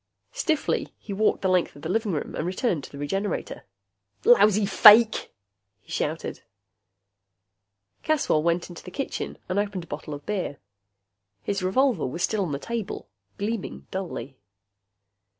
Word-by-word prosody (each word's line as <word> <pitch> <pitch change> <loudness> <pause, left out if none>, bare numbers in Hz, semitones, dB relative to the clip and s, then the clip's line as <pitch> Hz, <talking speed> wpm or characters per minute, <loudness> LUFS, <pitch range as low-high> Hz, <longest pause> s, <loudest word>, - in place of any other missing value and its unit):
Stiffly 330 -12 -1
he 200 - -7
walked 210 +1 +1
the - - +3
length 185 -2 +2
of 145 - -14
the - - -3
living 220 +1 0
room 155 - -3
and - - -2
returned 180 - -1
to - - -10
the 140 - -10
Regenerator. 195 +7 -3 0.6
"Lousy 210 -3 +6
fake!" 215 +3 +7 0.5
he - - -17
shouted. - - -3 1.6
Caswell 300 - +2
went 170 +2 +1
into 175 - -11
the - - -8
kitchen 275 +9 -4
and 185 +2 0
opened 205 -3 -2
a - - -14
bottle 150 - -6
of 145 - -11
beer. 190 -8 -2 0.9
His 200 -1 -1
revolver 225 - +2
was 170 +7 -4
still 215 +1 +1
on 180 -6 -1
the 140 - -1
table, 220 - -5 0.3
gleaming 210 0 -4
dully. 145 -9 -5
195 Hz, 150 wpm, -26 LUFS, 170-215 Hz, 1.6 s, fake